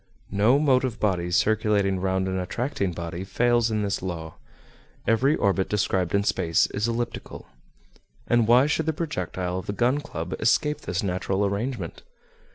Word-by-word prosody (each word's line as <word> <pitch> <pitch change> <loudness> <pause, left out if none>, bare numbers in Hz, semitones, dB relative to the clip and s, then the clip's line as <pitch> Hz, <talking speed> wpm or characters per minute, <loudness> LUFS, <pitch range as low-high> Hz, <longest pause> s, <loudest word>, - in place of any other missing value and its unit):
No 105 +7 +4
motive 130 -5 +2
body 90 -4 0
circulating 100 0 +2
round 95 0 0
an 95 0 -1
attracting 100 +1 -2
body 85 +1 -5
fails 120 +4 +2
in 110 -1 -1
this 100 0 -1
law. 85 -3 -5 0.7
Every 130 +7 +3
orbit 100 -5 +1
described 95 -3 0
in 100 - +2
space 85 -5 +2
is 105 +3 -1
elliptical. 115 0 -4 0.8
And 120 -2 +2
why 125 +3 +6
should 155 +1 0
the 160 - +2
projectile 90 - -3
of 95 - -10
the 100 - -2
Gun 120 +7 +2
Club 90 - -6
escape 150 +6 +2
this 90 +5 -2
natural 95 +1 0
arrangement? 100 -2 -3
100 Hz, 155 wpm, -25 LUFS, 95-120 Hz, 0.8 s, why